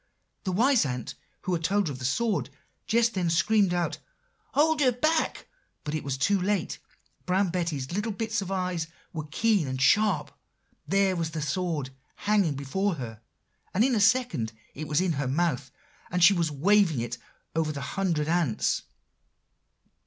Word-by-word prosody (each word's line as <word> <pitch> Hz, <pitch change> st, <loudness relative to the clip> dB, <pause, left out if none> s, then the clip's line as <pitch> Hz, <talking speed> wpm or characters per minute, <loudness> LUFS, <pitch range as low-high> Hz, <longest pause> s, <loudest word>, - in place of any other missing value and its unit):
The 185 Hz, -, 0 dB
wise 245 Hz, +6 st, +4 dB
ant 125 Hz, -4 st, -4 dB, 0.3 s
who 185 Hz, -, -1 dB
had 165 Hz, -1 st, -1 dB
told 200 Hz, +4 st, +2 dB
her 150 Hz, -, -2 dB
of 130 Hz, -, -9 dB
the 130 Hz, -, -4 dB
sword, 225 Hz, -, 0 dB, 0.4 s
just 230 Hz, +1 st, +3 dB
then 180 Hz, -3 st, 0 dB
screamed 195 Hz, +4 st, +3 dB
out, 175 Hz, -3 st, -1 dB, 0.6 s
'Hold 305 Hz, +1 st, +3 dB
her 255 Hz, -3 st, +5 dB
back!' 310 Hz, +6 st, 0 dB, 0.4 s
but 150 Hz, -, -4 dB
it 155 Hz, -, -2 dB
was 135 Hz, -1 st, -2 dB
too 195 Hz, +7 st, +2 dB
late; 200 Hz, +2 st, -1 dB, 0.5 s
Brown 190 Hz, +1 st, +2 dB
Betty's 165 Hz, -7 st, -2 dB
little 210 Hz, +5 st, -1 dB
bits 220 Hz, +1 st, -2 dB
of 190 Hz, -, -5 dB
eyes 180 Hz, -4 st, -1 dB, 0.3 s
were 155 Hz, -2 st, -5 dB
keen 210 Hz, -2 st, +2 dB
and 130 Hz, 0 st, -3 dB
sharp; 190 Hz, +1 st, +3 dB, 0.5 s
there 195 Hz, -1 st, +2 dB
was 165 Hz, -2 st, -1 dB
the 160 Hz, -1 st, -4 dB
sword, 150 Hz, -3 st, -2 dB, 0.2 s
hanging 200 Hz, -8 st, +1 dB
before 180 Hz, +8 st, -1 dB
her; 115 Hz, -6 st, -7 dB, 0.5 s
and 210 Hz, -, +4 dB
in 260 Hz, +1 st, +2 dB
a 225 Hz, -, +2 dB
second 205 Hz, -, +2 dB, 0.2 s
it 155 Hz, +2 st, -6 dB
was 150 Hz, +3 st, +2 dB
in 185 Hz, -2 st, +1 dB
her 140 Hz, -3 st, -1 dB
mouth, 140 Hz, -2 st, 0 dB, 0.4 s
and 180 Hz, 0 st, +1 dB
she 200 Hz, -, +8 dB
was 170 Hz, -4 st, +1 dB
waving 170 Hz, -, +3 dB
it 120 Hz, +1 st, -4 dB, 0.4 s
over 160 Hz, -1 st, +1 dB
the 140 Hz, -2 st, -5 dB
hundred 160 Hz, 0 st, -1 dB
ants. 165 Hz, -9 st, +1 dB
175 Hz, 170 wpm, -27 LUFS, 150-205 Hz, 0.6 s, she